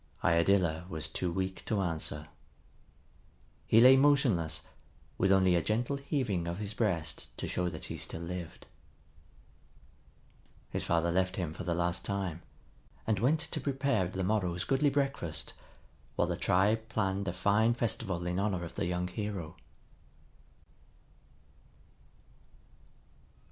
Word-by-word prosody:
Iadilla 85 0 +2
was 80 -6 -3
too 90 -2 -2
weak 95 +2 -3
to 110 - 0
answer. 80 -4 -2 1.4
He 110 - +6
lay 130 +3 +9
motionless, 125 - +3 0.6
with 95 - +3
only 95 -2 +5
a 85 - +3
gentle 120 - 0
heaving 125 - -1
of 85 +1 -3
his 105 0 -4
breast 90 -8 -1
to - - -4
show 90 -1 -1
that - - -8
he - - -5
still 80 - -5
lived. 85 -1 -6 2.1
His - - -2
father 85 0 +1
left 95 +1 +1
him 85 -5 -3
for 90 - -6
the 85 0 -1
last 85 +1 -1
time, 95 -4 -2 0.6
and 110 -3 +1
went 145 +8 +3
to - - -4
prepare 135 -8 +1
the 95 +1 -3
morrow's 90 -3 0
goodly 135 +2 +2
breakfast, 135 - -2 0.6
while - - +2
the - - -1
tribe 110 +4 +2
planned 100 -3 -1
a - - +1
fine 105 +5 +3
festival 105 -7 -2
in 90 +1 -1
honor 95 -4 0
of 85 - -9
the - - -2
young 90 0 -1
hero. 90 -3 -5
95 Hz, 135 wpm, -31 LUFS, 85-110 Hz, 2.1 s, lay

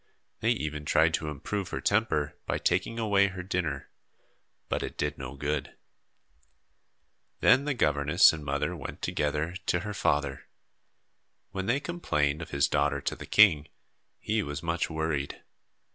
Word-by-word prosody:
They - - +1
even 75 +1 -4
tried 80 +2 +3
to 80 - -1
improve 90 +7 -4
her - - -3
temper 100 -9 +1
by - - 0
taking 115 - 0
away 100 -3 +3
her 95 -2 -6
dinner, 90 -6 -3 0.8
but - - -1
it - - -5
did 75 0 -1
no 65 +1 -6
good. 75 +1 -3 1.6
Then 140 - +5
the 145 -2 0
governess 75 -4 +4
and 80 -2 -6
mother 70 -1 -1
went - - -8
together 75 +3 -1
to 90 - +1
her 105 +1 -5
father. 70 -7 -1 1.0
When 95 0 -4
they 125 +4 +2
complained 75 - -1
of 80 - -7
his 70 0 +2
daughter 75 -1 +1
to - - -2
the - - -10
king, 80 -8 +5 0.5
he 110 +1 0
was 75 -2 -5
much 85 0 -1
worried. 80 -3 -2
80 Hz, 150 wpm, -28 LUFS, 75-100 Hz, 1.6 s, Then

